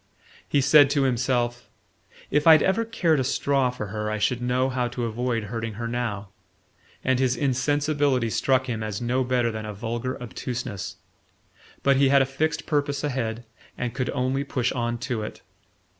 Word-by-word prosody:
He 145 - +3
said 140 +1 +6
to 145 -1 +2
himself: 120 -1 0 0.6
"If 150 +2 +2
I'd 160 -2 +8
ever 210 +5 +2
cared 175 -9 +1
a - - +1
straw 135 0 +1
for 110 -5 -6
her 105 +1 -3
I 110 - -1
should 120 +3 0
know 125 +1 +1
how 125 -1 -1
to 120 0 -3
avoid 115 0 -1
hurting 115 +1 -4
her 115 +3 -4
now" 115 -4 -3 0.7
and 130 -1 +2
his 130 -2 +1
insensibility 140 -1 +1
struck 130 +2 +2
him 115 -4 -3
as 105 -2 -3
no 125 +2 0
better 125 -2 +1
than 110 -1 -5
a 105 - -6
vulgar 120 +5 -3
obtuseness. 120 -4 -5 0.9
But 140 -1 +4
he 135 0 +4
had 140 0 +5
a - - -1
fixed 150 +3 -2
purpose 145 -3 -1
ahead 120 -5 -2 0.3
and 120 -2 -3
could 130 -1 -2
only 130 +2 0
push 130 -3 -1
on 120 -1 -2
to 120 -3 -2
it. 105 - -7
125 Hz, 175 wpm, -25 LUFS, 115-140 Hz, 0.9 s, I'd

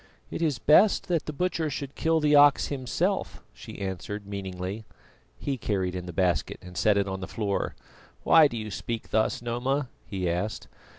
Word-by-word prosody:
"It - - -4
is 155 -6 +1
best 170 - +4
that 170 -3 0
the - - -2
butcher 165 0 -1
should 140 -1 -5
kill 160 0 +1
the 150 -1 +2
ox 145 0 +6
himself," 130 -3 -2
she - - -10
answered 100 +1 -5
meaningly. 95 +1 -5 0.5
He 135 -3 -3
carried 95 -4 -1
in 90 -1 -5
the - - -5
basket 90 0 0
and 90 0 -12
set 105 +2 +3
it 100 0 +1
on 95 0 -3
the 95 - -5
floor. 100 -1 -2 0.5
"Why 160 -2 +7
do 120 - -6
you 110 -1 -5
speak 115 +3 -5
thus, 110 +2 +1
Noma?" 125 +3 -1 0.2
he 95 -3 -2
asked. 90 +6 -2
110 Hz, 180 wpm, -27 LUFS, 95-145 Hz, 0.5 s, Why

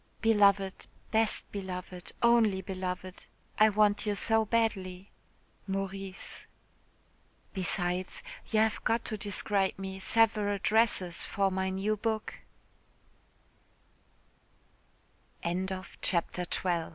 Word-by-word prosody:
"Beloved, 200 -3 +3 0.2
best 220 0 +2
beloved, 185 -2 -6
only 225 -5 +4
beloved, 185 0 -5 0.3
I 215 0 +7
want 210 0 +2
you 205 - +1
so 225 +2 +3
badly. 195 -4 -1 0.6
"MAURICE. 195 0 -5 1.1
"Besides, 180 -1 -2 0.3
you 215 -1 +3
have 220 -1 +1
got 230 +1 +1
to 220 - -3
describe 200 -1 0
me 190 0 -6
several 210 -1 +3
dresses 200 -4 +2
for 195 -2 0
m 195 +4 0
200 Hz, 80 wpm, -30 LUFS, 190-215 Hz, 1.1 s, I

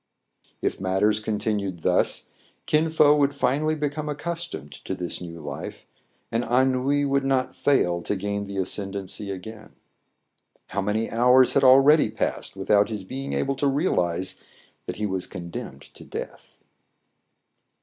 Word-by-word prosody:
If - - -1
matters 95 +3 +2
continued 105 -5 -2
thus, - - +1 0.4
Kin 155 +1 +2
Fo 150 -2 +5
would 140 -1 +2
finally 150 +3 +1
become 150 0 -3
accustomed 160 - -4
to 95 - -3
this 90 0 -4
new 85 -1 -8
life, 75 -2 -7 0.5
and 115 +1 0
ennui 130 +3 +2
would 140 0 +1
not 130 -1 0
fail 90 -11 +2
to 105 - -2
gain 100 +1 -3
the 100 0 -6
ascendency 95 +1 -2
again. 105 +3 -8 1.0
How - - -1
many 105 +3 -1
hours 125 +2 +5
had 140 - +3
already 135 +1 +6
passed 110 - -3
without 100 +1 +2
his 105 -3 -4
being 135 +7 -5
able 140 0 0
to 140 - +1
realize 95 - 0 0.5
that - - -4
he 105 - -2
was 95 -2 -2
condemned 85 -7 -7
to - - -13
death - - -8
110 Hz, 140 wpm, -25 LUFS, 95-140 Hz, 1.0 s, already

